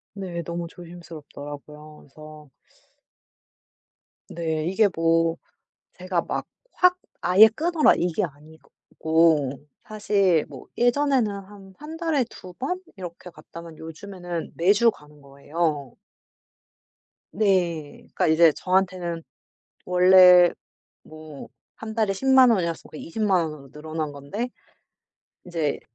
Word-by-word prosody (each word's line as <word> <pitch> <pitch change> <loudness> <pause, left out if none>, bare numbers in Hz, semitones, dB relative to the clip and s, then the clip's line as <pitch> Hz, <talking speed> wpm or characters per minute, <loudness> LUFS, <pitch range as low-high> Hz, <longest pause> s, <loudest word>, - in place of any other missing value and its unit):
네. 180 -4 -5
너무 170 +1 -5
조심스럽더라고요. 150 -3 -11
그래서 155 0 -14 1.8
네. 160 -2 -3
이게 200 +4 +3
뭐 165 0 +2 0.6
제가 185 -1 -1
막 - - -4 0.3
'확 360 0 +3 0.2
아예 185 +5 +7
끊어라.' 315 +8 +2
이게 175 +4 -1
아니고 160 -1 -1 0.3
사실 200 -6 +1
뭐 135 -3 -12
예전에는 250 -1 +2
한 195 -1 -11
1 310 +2 -9
달에 325 -5 0
2 185 -1 -12
번 320 - -4 0.2
이렇게 180 -1 -9
갔다면 170 -1 -12
요즘에는 175 +1 -7
매주 205 +7 +4
가는 150 -5 -19
거예요. 140 0 -3 1.4
네. 175 -7 0
그러니까 - - -2
이제 160 0 +5
저한테는 180 -1 -1 0.6
원래 180 -1 +7 0.5
뭐 155 -2 -12 0.3
1 220 0 -7
달에 215 -3 +1
100,000 260 +5 +5
원이었으니까 170 -7 -2
200,000 195 +2 0
원으로 140 -3 -12
늘어난 155 0 -5
건데 145 - -5 1.0
인제 165 -5 -2
175 Hz, 215 characters per minute, -24 LUFS, 155-200 Hz, 1.8 s, 아예